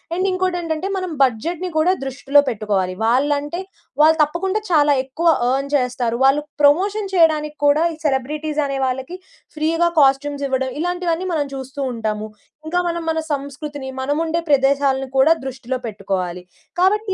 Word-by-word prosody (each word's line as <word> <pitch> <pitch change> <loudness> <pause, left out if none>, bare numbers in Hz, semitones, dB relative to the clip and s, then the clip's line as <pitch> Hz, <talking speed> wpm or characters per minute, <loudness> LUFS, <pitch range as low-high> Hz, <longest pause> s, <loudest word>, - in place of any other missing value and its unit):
And 370 +2 0
ఇంకోటి 370 -1 -1
ఏంటంటే, 325 +3 -3
మనం 370 -2 -3
బడ్జెట్‌ని 335 +9 -1
కూడా 335 +4 +4
దృష్టిలో 275 +2 +3
పెట్టుకోవాలి. 200 -4 -1
వాళ్ళంటే 290 +7 +1 0.4
వాళ్ళు 320 +1 +6
తప్పకుండా 375 +7 -1
చాలా 295 -3 +4
ఎక్కువ 285 +6 -2 0.2
అర్న్ 275 +2 -1
చేస్తారు. 250 -2 -1
వాళ్ళు 275 +2 +4 0.2
ప్రమోషన్ 390 +7 +3
చేయడానికి 305 -3 +3
కూడా 290 +2 +4
ఈ - - -9
సెలబ్రిటీస్ 295 +3 -1
అనే 275 -1 -2
వాళ్ళకి 265 +7 -3 0.4
ఫ్రీగా 325 +2 +1
కాస్ట్యూమ్స్ 280 +1 +2
ఇవ్వడం 260 0 0
ఇలాంటివన్నీ, 355 0 -1
మనం 300 -3 0
చూస్తూ 270 +1 -6
ఉంటాము. 215 -2 -3 0.4
ఇంకా 345 +3 0
మనం, 340 0 -2
మన 320 0 0
సంస్కృతిని, 280 0 -6
మనము 290 +3 -1
ఉండే 320 - -4 0.2
ప్రదేశాలను 270 -1 +2
కూడా 270 +4 +5
దృష్టిలో 260 -1 -4
పెట్టుకోవాలి. 190 -4 -3 0.4
కాబట్టి 400 +2 +2
290 Hz, 145 wpm, -20 LUFS, 265-330 Hz, 0.4 s, వాళ్ళు